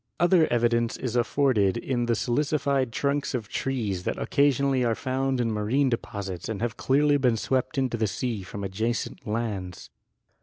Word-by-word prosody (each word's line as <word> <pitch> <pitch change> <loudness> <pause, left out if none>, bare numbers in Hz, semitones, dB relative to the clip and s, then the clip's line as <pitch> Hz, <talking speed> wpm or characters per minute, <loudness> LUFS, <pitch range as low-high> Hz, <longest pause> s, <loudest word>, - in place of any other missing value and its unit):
Other 175 -1 +4
evidence 120 -1 +1
is 125 -2 -4
afforded 120 -5 +2
in 120 0 -1
the 115 - +2
silicified 140 +1 0
trunks 140 +3 -1
of 110 -4 -4
trees 110 -9 -2
that - - -2
occasionally 140 -2 +2
are 115 -2 +1
found 130 +1 -1
in 115 -2 +1
marine 115 +6 +1
de 115 - +1
posits 95 -3 -6
and 110 -3 -3
have 115 -2 -2
clearly 145 +2 +3
been 125 -4 +2
swept 130 +5 -1
into 130 -3 0
the 110 -1 +1
sea 115 0 -3
from 100 +2 -7
adjacent 110 +6 -3
lands. 105 -5 -4
120 Hz, 165 wpm, -26 LUFS, 110-135 Hz, -, Other